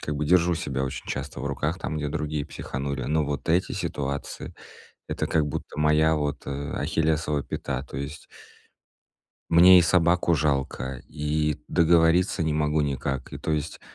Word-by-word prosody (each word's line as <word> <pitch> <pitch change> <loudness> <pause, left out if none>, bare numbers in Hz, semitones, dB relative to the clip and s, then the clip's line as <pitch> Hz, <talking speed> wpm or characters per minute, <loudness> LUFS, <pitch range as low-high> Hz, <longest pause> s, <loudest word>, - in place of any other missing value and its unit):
как 75 - -3
бы 75 - -1
держу 85 +1 +4
себя 70 -4 -2
очень 65 - -6
часто - - -5
в - - -3
руках 75 +5 -2
там, 75 - -4
где 75 -1 -2
другие 75 0 -3
психанули. 70 0 -4
Но 75 +3 +1
вот 70 -1 -4
эти 90 +3 +2
ситуации- 70 -1 -4 0.5
это - - -2
как 75 -2 +1
будто 75 - -6
моя 75 +1 +4
вот, 75 -2 -2
э, - - -4 0.3
ахиллесова 80 -2 0
пята. 65 0 -4
То - - -8
есть 70 +3 -5 1.3
мне 90 +2 +8
и - - +6
собаку 85 0 +3
жалко, 70 -3 -1
и 75 0 -1
договориться 85 +1 +3
не 80 -1 0
могу 75 0 +1
никак. 70 -2 -3
И, - - -6
то - - -3
есть, 75 -2 -2
75 Hz, 165 wpm, -26 LUFS, 70-80 Hz, 1.3 s, мне